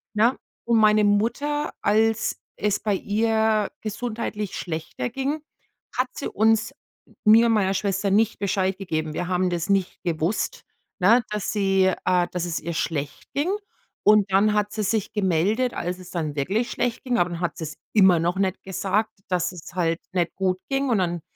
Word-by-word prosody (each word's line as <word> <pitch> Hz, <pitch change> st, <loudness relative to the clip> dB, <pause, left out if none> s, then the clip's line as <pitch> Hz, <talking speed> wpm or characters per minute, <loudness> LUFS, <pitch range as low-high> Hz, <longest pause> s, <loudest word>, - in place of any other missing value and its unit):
ne? 230 Hz, +5 st, +4 dB, 0.3 s
Und 235 Hz, -1 st, +3 dB
meine 215 Hz, 0 st, +5 dB
Mutter, 240 Hz, +9 st, +1 dB
als 220 Hz, +1 st, +1 dB
es 210 Hz, 0 st, 0 dB
bei 205 Hz, -2 st, 0 dB
ihr 220 Hz, +1 st, +1 dB
gesundheitlich 215 Hz, -2 st, -4 dB
schlechter 160 Hz, -6 st, -4 dB
ging, 275 Hz, +3 st, -2 dB, 0.6 s
hat 255 Hz, +1 st, +1 dB
sie -, -, -4 dB
uns 225 Hz, +4 st, +2 dB, 0.5 s
mir 225 Hz, +2 st, +7 dB
und 230 Hz, -, +3 dB
meiner 195 Hz, -3 st, +2 dB
Schwester 195 Hz, +1 st, 0 dB
nicht 215 Hz, +3 st, +2 dB
Bescheid 190 Hz, -1 st, 0 dB
gegeben. 155 Hz, -4 st, -2 dB
Wir 175 Hz, +3 st, -3 dB
haben 180 Hz, 0 st, +1 dB
das 170 Hz, +1 st, -2 dB
nicht 195 Hz, -2 st, 0 dB
gewusst, 170 Hz, +4 st, -1 dB, 0.3 s
ne, 215 Hz, +6 st, +5 dB
dass 210 Hz, -2 st, -2 dB
sie 195 Hz, -2 st, +2 dB
äh, 180 Hz, -1 st, +3 dB
dass 180 Hz, -1 st, -2 dB
es 170 Hz, -2 st, -2 dB
ihr 170 Hz, +2 st, -5 dB
schlecht 145 Hz, -3 st, -3 dB
ging. 305 Hz, +7 st, +1 dB, 0.6 s
Und 210 Hz, -2 st, +5 dB
dann 205 Hz, +3 st, +4 dB
hat 210 Hz, 0 st, 0 dB
sie 215 Hz, 0 st, -2 dB
sich 205 Hz, 0 st, -1 dB
gemeldet, 205 Hz, +6 st, +1 dB
als 180 Hz, +1 st, -3 dB
es 180 Hz, -1 st, -12 dB
dann 155 Hz, -4 st, -3 dB
wirklich 195 Hz, -, 0 dB
schlecht 245 Hz, -1 st, -2 dB
ging, 250 Hz, -3 st, 0 dB
aber 175 Hz, 0 st, +1 dB
dann 170 Hz, -, -5 dB
hat 175 Hz, -1 st, -2 dB
sie 160 Hz, -, -5 dB
es 155 Hz, -, -6 dB, 0.2 s
immer 190 Hz, -5 st, +6 dB
noch 175 Hz, +2 st, 0 dB
nicht 190 Hz, -1 st, 0 dB
gesagt, 195 Hz, +3 st, -1 dB, 0.2 s
dass 180 Hz, 0 st, 0 dB
es 175 Hz, -2 st, -11 dB
halt 165 Hz, -2 st, 0 dB
nicht 175 Hz, -2 st, 0 dB
gut 185 Hz, -1 st, 0 dB
ging 275 Hz, 0 st, 0 dB
und 225 Hz, -4 st, +2 dB
dann 175 Hz, -2 st, -1 dB
200 Hz, 180 wpm, -24 LUFS, 180-220 Hz, 0.6 s, mir